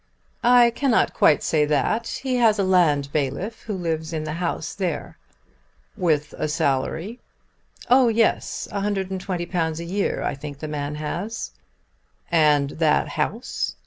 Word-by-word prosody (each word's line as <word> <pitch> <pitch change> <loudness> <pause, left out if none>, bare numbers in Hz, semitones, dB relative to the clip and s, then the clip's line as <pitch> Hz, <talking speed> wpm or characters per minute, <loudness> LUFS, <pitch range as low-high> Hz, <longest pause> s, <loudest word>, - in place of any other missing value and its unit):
"I 240 -1 +6
cannot 255 0 +1
quite 150 - +4
say 155 -2 +2
that. 150 - 0 0.2
He 260 -2 0
has 225 -3 +4
a 200 - +1
land 160 -7 +3
bailiff 155 - -2
who 210 - -4
lives 165 -2 -3
in 155 -1 -2
the 155 0 -4
house 170 -2 -2
there." 185 -3 -4 0.8
"With 155 -7 0
a - - 0
salary?" 160 - -1 0.7
"Oh 255 0 +5
yes; 225 -1 +1
£120 185 -4 -2
a - - -4
year 195 +4 -1
I - - -1
think 145 0 -8
the 155 - -6
man 150 -1 -4
has." 175 +9 -4 0.8
"And 150 -4 +3
that 155 -2 +3
house?" 210 +10 -2
170 Hz, 140 wpm, -23 LUFS, 150-210 Hz, 0.8 s, I